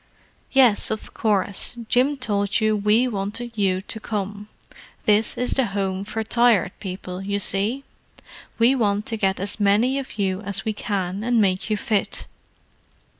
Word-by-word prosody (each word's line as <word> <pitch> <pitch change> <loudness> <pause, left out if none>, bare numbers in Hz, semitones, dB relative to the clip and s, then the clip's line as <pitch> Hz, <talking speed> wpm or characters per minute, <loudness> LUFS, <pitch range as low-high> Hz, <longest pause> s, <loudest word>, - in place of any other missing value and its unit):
"Yes, 250 -6 +4
of 220 -1 -5
course. 200 0 +1
Jim 265 +5 +2
told 205 -5 0
you 215 -1 +2
we 210 +4 +3
wanted 220 +2 -3
you 190 -3 +1
to 220 +3 -6
come. 205 -1 -4 0.6
This 210 +1 +3
is 250 - -1
the 265 -3 +2
Home 190 -1 -1
for 220 +1 -3
Tired 225 -5 +3
People, 185 -1 -6
you 200 +1 -2
see; 205 +7 -1 0.7
we 235 +3 +5
want 210 -4 0
to 230 - 0
get 195 -2 0
as 200 +3 -3
many 215 +7 +3
of 265 -5 -8
you 190 -1 -1
as 200 -2 -3
we 220 - 0
can 195 -1 -3
and 240 0 +2
make 190 0 +1
you 215 - +1
fit. 210 -1 -1
210 Hz, 160 wpm, -23 LUFS, 195-230 Hz, 0.7 s, we